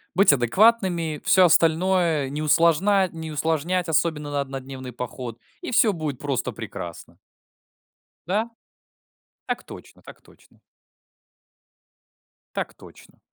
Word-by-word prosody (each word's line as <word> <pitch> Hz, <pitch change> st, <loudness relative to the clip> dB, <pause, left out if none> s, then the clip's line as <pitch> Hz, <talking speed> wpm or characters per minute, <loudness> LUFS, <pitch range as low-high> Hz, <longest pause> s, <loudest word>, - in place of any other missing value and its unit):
быть 195 Hz, -5 st, +6 dB
адекватными, 170 Hz, -, +2 dB
всё 185 Hz, -1 st, +6 dB
остальное 165 Hz, -3 st, +2 dB
не 145 Hz, +2 st, -4 dB
усложна 170 Hz, +5 st, +3 dB
не 160 Hz, -2 st, -7 dB
усложнять, 165 Hz, +4 st, -1 dB
особенно 150 Hz, -2 st, 0 dB
на 145 Hz, -1 st, 0 dB
однодневный 135 Hz, -1 st, -8 dB
поход, 120 Hz, -1 st, -7 dB, 0.2 s
и 350 Hz, -, -8 dB
всё 225 Hz, -2 st, +4 dB
будет 155 Hz, -6 st, -4 dB
просто 140 Hz, -3 st, -2 dB
прекрасно. 85 Hz, -1 st, -8 dB, 1.1 s
Да. 215 Hz, +6 st, 0 dB, 1.0 s
Так -, -, -3 dB
точно, -, -, -13 dB
так -, -, -14 dB
точно. -, -, -23 dB, 2.0 s
Так -, -, -3 dB
точно. -, -, -17 dB
160 Hz, 110 wpm, -24 LUFS, 140-185 Hz, 2.0 s, быть